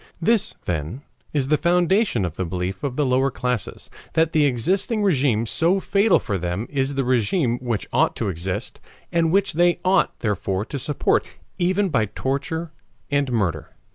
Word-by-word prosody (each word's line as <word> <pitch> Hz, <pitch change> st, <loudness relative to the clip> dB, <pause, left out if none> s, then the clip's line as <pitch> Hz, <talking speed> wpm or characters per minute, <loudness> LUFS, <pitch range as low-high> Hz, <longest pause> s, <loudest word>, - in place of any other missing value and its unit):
This, 215 Hz, +4 st, +1 dB
then, 85 Hz, -, -3 dB, 0.3 s
is 140 Hz, -3 st, -1 dB
the 150 Hz, -, +3 dB
foundation 175 Hz, -, +2 dB
of 85 Hz, -3 st, -5 dB
the 95 Hz, -, -2 dB
belief 90 Hz, +2 st, -4 dB
of 135 Hz, -3 st, -2 dB
the 150 Hz, -, +1 dB
lower 130 Hz, +1 st, +2 dB
classes 125 Hz, -3 st, -3 dB, 0.3 s
that 160 Hz, 0 st, +2 dB
the 155 Hz, -2 st, +4 dB
existing 185 Hz, -, 0 dB
RÉGIME 130 Hz, -, +2 dB
so 170 Hz, -, +2 dB
fatal 200 Hz, +1 st, +3 dB
for 100 Hz, -2 st, -3 dB
them 90 Hz, +5 st, -2 dB
is 135 Hz, 0 st, -1 dB
the 135 Hz, -, +1 dB
RÉGIME 125 Hz, -, +1 dB
which 120 Hz, -4 st, -2 dB
ought 155 Hz, +6 st, +2 dB
to 115 Hz, -, -2 dB
exist, 90 Hz, 0 st, -3 dB, 0.3 s
and 165 Hz, -1 st, +2 dB
which 195 Hz, -1 st, +2 dB
they 175 Hz, +2 st, +3 dB
ought 190 Hz, +1 st, +2 dB
therefore 100 Hz, -2 st, -1 dB
to 140 Hz, -, -5 dB
support 145 Hz, +2 st, +1 dB, 0.4 s
even 185 Hz, +3 st, +1 dB
by 115 Hz, -9 st, +2 dB
torture 140 Hz, -, -3 dB, 0.4 s
and 140 Hz, -2 st, +1 dB
murder. 85 Hz, -10 st, -2 dB
135 Hz, 170 wpm, -22 LUFS, 110-170 Hz, 0.4 s, the